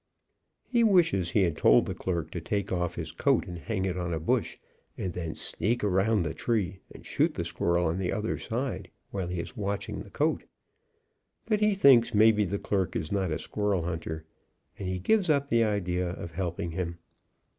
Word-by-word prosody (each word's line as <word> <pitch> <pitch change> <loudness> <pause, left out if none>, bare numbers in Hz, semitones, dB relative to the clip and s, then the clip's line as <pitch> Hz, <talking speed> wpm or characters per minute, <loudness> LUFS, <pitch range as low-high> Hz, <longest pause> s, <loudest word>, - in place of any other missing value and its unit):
He 240 -2 +3
wishes 165 - +4
he 100 - +3
had 85 -4 +1
told - - +5
the - - -3
clerk 85 -5 -3
to - - -4
take 100 -2 -2
off 90 -2 -1
his 80 -2 -5
coat 130 - +2
and 90 -2 -7
hang 95 +1 -2
it 90 -1 -2
on 85 -1 -2
a - - -2
bush, 80 - 0 0.4
and 90 - -3
then 85 -2 -4
sneak 110 +7 -1
around 100 +1 +2
the 80 - -3
tree 100 -5 -1
and - - -13
shoot - - +1
the - - -2
squirrel 85 0 0
on 85 +3 0
the 90 -2 -1
other 105 +1 -2
side, 125 +3 -3 0.2
while 95 -3 -3
he 90 0 -3
is 85 - -6
watching 100 -2 -3
the - - -9
coat, - - 0 1.0
but 215 -2 +1
he 210 -1 +3
thinks 130 - +6
maybe 105 0 +5
the 100 +2 -2
clerk 95 -2 -1
is 80 -3 -3
not 95 -3 0
a 80 - -1
squirrel 100 +2 -1
hunter, 80 -2 -4 0.5
and 95 - -3
he 95 - -1
gives 185 - +2
up 140 -2 +2
the 115 -1 +4
idea 90 -4 0
of 85 -1 -6
helping 85 -1 -3
him. 85 0 -3
95 Hz, 200 wpm, -28 LUFS, 85-110 Hz, 1.0 s, thinks